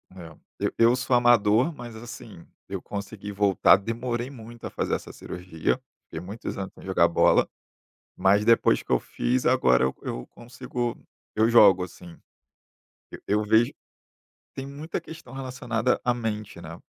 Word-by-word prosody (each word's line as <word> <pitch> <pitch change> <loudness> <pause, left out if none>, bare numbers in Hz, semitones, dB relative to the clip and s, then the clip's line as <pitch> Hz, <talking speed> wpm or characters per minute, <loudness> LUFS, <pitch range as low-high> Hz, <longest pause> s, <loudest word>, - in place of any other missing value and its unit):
eh, 85 -4 -10 0.2
eu - - -1
eu 115 +1 +6
sou 130 0 +1
amador, 120 +2 +4
mas, 120 -3 -9
assim, 120 +2 -10 0.2
eu - - -5
consegui 100 0 -6
voltar, 100 -1 +5
demorei 120 +4 -3
muito 120 -2 -11
a - - -5
fazer - - -1
essa - - -8
cirurgia, 90 +5 -3 0.3
fiquei 80 - -7
muitos 105 +4 -6
anos 95 -1 -5
sem - - -15
jogar 95 -3 +3
bola, 85 - +3 0.7
mas 95 +2 +3
depois 115 -1 +4
que - - -19
eu - - +4
fiz, 125 +1 -1
agora 65 - +4
eu 65 - 0
eu - - -5
consigo 120 0 -5 0.4
eu 110 +1 +4
jogo, 100 -6 +6
assim. 85 -1 -12 1.1
Eu 105 +1 +1
vejo, 110 +3 +4 0.8
tem 135 - -5
muita 145 +4 -5
questão 160 -6 -12
relacionada 125 -3 -1
à 125 - +2
mente, 110 -3 -4
né. - - -9
115 Hz, 150 wpm, -26 LUFS, 100-125 Hz, 1.1 s, eu